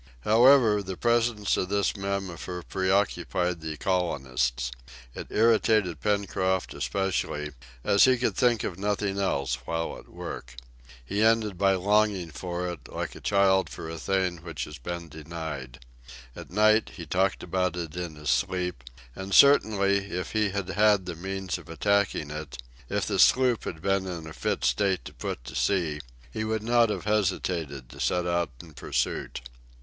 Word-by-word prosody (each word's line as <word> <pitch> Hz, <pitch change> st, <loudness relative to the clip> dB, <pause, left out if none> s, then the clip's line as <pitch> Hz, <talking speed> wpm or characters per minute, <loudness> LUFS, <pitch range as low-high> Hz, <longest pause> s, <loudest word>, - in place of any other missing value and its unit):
However, 115 Hz, -, +5 dB
the 95 Hz, -2 st, -6 dB
presence 115 Hz, -3 st, +2 dB
of 90 Hz, -, -1 dB
this 100 Hz, +1 st, +1 dB
mammifer 95 Hz, -3 st, -4 dB
preoccupied 95 Hz, -2 st, 0 dB
the 80 Hz, -1 st, -5 dB
colonists. 65 Hz, -10 st, -1 dB, 0.4 s
It -, -, -7 dB
irritated 110 Hz, -6 st, +3 dB
Pencroft 95 Hz, -3 st, 0 dB
especially, 85 Hz, -6 st, -2 dB, 0.3 s
as 100 Hz, 0 st, +5 dB
he 130 Hz, -1 st, +4 dB
could 125 Hz, -, 0 dB
think 120 Hz, -4 st, +2 dB
of 85 Hz, -, -4 dB
nothing 100 Hz, -1 st, -1 dB
else 70 Hz, -9 st, 0 dB
while 80 Hz, 0 st, -2 dB
at -, -, -17 dB
work. -, -, -8 dB, 0.5 s
He 100 Hz, +10 st, -1 dB
ended 110 Hz, -3 st, +3 dB
by 95 Hz, +1 st, +3 dB
longing 100 Hz, -2 st, +1 dB
for 90 Hz, +3 st, -4 dB
it, 85 Hz, -7 st, -7 dB
like -, -, -4 dB
a -, -, -11 dB
child 95 Hz, -1 st, +3 dB
for -, -, -7 dB
a 80 Hz, 0 st, -6 dB
thing 95 Hz, -1 st, 0 dB
which 85 Hz, -2 st, -6 dB
it -, -, -11 dB
has 75 Hz, -, -9 dB
been 85 Hz, -1 st, -5 dB
denied. 75 Hz, -5 st, -7 dB, 0.5 s
At -, -, -9 dB
night 110 Hz, +3 st, +3 dB
he 85 Hz, -, -7 dB
talked 95 Hz, +5 st, 0 dB
about 90 Hz, 0 st, -1 dB
it 85 Hz, -2 st, -5 dB
in 85 Hz, -3 st, -5 dB
his 75 Hz, -1 st, -1 dB
sleep, 90 Hz, -7 st, -1 dB, 0.3 s
and 95 Hz, +1 st, -3 dB
certainly 105 Hz, -8 st, +6 dB
if 90 Hz, 0 st, -4 dB
he 110 Hz, -2 st, +1 dB
had 100 Hz, -1 st, -3 dB
had 105 Hz, -2 st, +3 dB
the 90 Hz, -, -4 dB
means 95 Hz, +1 st, -4 dB
of -, -, -15 dB
attacking 100 Hz, -3 st, 0 dB
it, 75 Hz, -3 st, -6 dB, 0.3 s
if -, -, 0 dB
the -, -, -1 dB
sloop 125 Hz, -3 st, +4 dB
had 80 Hz, -1 st, -6 dB
been 95 Hz, -1 st, +1 dB
in 85 Hz, -3 st, -5 dB
a 80 Hz, -, -8 dB
fit -, -, -2 dB
state 95 Hz, -2 st, +1 dB
to -, -, -9 dB
put -, -, -5 dB
to 65 Hz, +1 st, -9 dB
sea, 80 Hz, 0 st, 0 dB, 0.3 s
he 110 Hz, -, -3 dB
would 110 Hz, 0 st, -2 dB
not 120 Hz, 0 st, +4 dB
have -, -, -3 dB
hesitated 85 Hz, -, -1 dB
to -, -, -12 dB
set 90 Hz, -1 st, +1 dB
out 85 Hz, -1 st, 0 dB
in 80 Hz, -3 st, -14 dB
pursuit. 70 Hz, -, -2 dB
95 Hz, 165 wpm, -27 LUFS, 80-100 Hz, 0.5 s, certainly